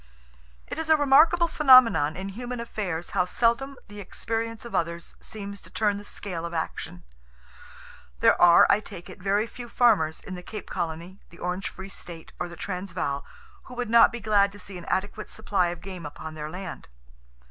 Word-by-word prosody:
"It -, -, -6 dB
is 320 Hz, 0 st, -4 dB
a 315 Hz, -, +6 dB
remarkable 315 Hz, +5 st, +5 dB
phenomenon 255 Hz, -, +6 dB
in 190 Hz, +1 st, -5 dB
human 245 Hz, +4 st, -6 dB
affairs 190 Hz, -7 st, -4 dB
how 180 Hz, -2 st, +2 dB
seldom 235 Hz, +8 st, 0 dB
the 205 Hz, 0 st, -10 dB
experience 225 Hz, +4 st, -4 dB
of 235 Hz, -, -9 dB
others 170 Hz, 0 st, -2 dB
seems 200 Hz, -2 st, -7 dB
to -, -, -15 dB
turn 205 Hz, -2 st, +1 dB
the -, -, -10 dB
scale 185 Hz, -4 st, -6 dB
of 170 Hz, 0 st, -5 dB
action. 125 Hz, -, -4 dB, 1.2 s
There -, -, +4 dB
are, 170 Hz, -1 st, +8 dB
I -, -, +4 dB
take 180 Hz, -3 st, -10 dB
it, 180 Hz, -, -13 dB
very 200 Hz, +3 st, +1 dB
few 240 Hz, +1 st, -9 dB
farmers, 210 Hz, -12 st, +3 dB
in 190 Hz, -, -9 dB
the 180 Hz, -, -6 dB
Cape 210 Hz, +3 st, -8 dB
Colony, 170 Hz, +4 st, -4 dB
the 170 Hz, -, -16 dB
Orange 180 Hz, +2 st, -3 dB
Free 190 Hz, -, -9 dB
State, 170 Hz, -4 st, -11 dB
or 175 Hz, -, -3 dB
the 170 Hz, -, -9 dB
Transvaal, 180 Hz, -6 st, -3 dB, 0.4 s
who 250 Hz, -, -10 dB
would 245 Hz, -2 st, -3 dB
not 235 Hz, 0 st, +7 dB
be 240 Hz, -, -5 dB
glad 205 Hz, -2 st, +3 dB
to -, -, -11 dB
see 185 Hz, -1 st, -8 dB
an 170 Hz, -, -11 dB
adequate 205 Hz, +3 st, -2 dB
supply 200 Hz, -4 st, 0 dB
of 170 Hz, -1 st, -5 dB
game 185 Hz, -2 st, -8 dB
upon 155 Hz, +2 st, -8 dB
their 155 Hz, -1 st, -6 dB
land. 180 Hz, +2 st, -7 dB
195 Hz, 190 wpm, -26 LUFS, 175-230 Hz, 1.2 s, are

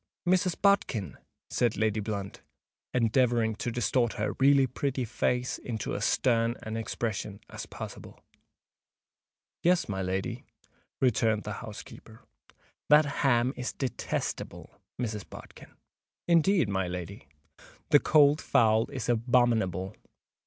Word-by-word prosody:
"Mrs. 185 Hz, 0 st, +2 dB
Bodkin!" 190 Hz, -, +1 dB, 0.3 s
said 120 Hz, -3 st, +1 dB
Lady 110 Hz, 0 st, +1 dB
Blunt, 100 Hz, -2 st, -5 dB, 0.5 s
endeavouring 120 Hz, -1 st, +2 dB
to 120 Hz, -, -3 dB
distort 120 Hz, 0 st, 0 dB
her 105 Hz, -2 st, -2 dB
really 135 Hz, 0 st, +5 dB
pretty 130 Hz, 0 st, -2 dB
face 125 Hz, +3 st, -1 dB
into 110 Hz, -4 st, -4 dB
as -, -, -1 dB
stern 115 Hz, -1 st, +2 dB
an 110 Hz, 0 st, -5 dB
expression 110 Hz, -2 st, -3 dB
as -, -, -7 dB
possible. -, -, -9 dB, 1.4 s
"Yes, 180 Hz, +1 st, +2 dB
my 95 Hz, -3 st, -3 dB
lady," 95 Hz, +1 st, -3 dB, 0.6 s
returned 110 Hz, -4 st, +2 dB
the 105 Hz, -, -5 dB
housekeeper. 110 Hz, +1 st, -11 dB, 0.7 s
"That 150 Hz, +1 st, +7 dB, 0.2 s
ham 125 Hz, -1 st, +3 dB
is 125 Hz, -, -4 dB
detestable, 130 Hz, -3 st, -4 dB, 0.2 s
Mrs. 110 Hz, -5 st, -3 dB
Bodkin." -, -, -13 dB, 0.5 s
"Indeed, 170 Hz, -, +4 dB
my 95 Hz, -2 st, -1 dB
lady." 90 Hz, -1 st, -7 dB, 0.6 s
"The 145 Hz, -, +8 dB
cold 150 Hz, 0 st, +4 dB
fowl's 115 Hz, +3 st, +2 dB
abominable!" 115 Hz, -6 st, +1 dB
115 Hz, 110 wpm, -29 LUFS, 105-130 Hz, 1.4 s, The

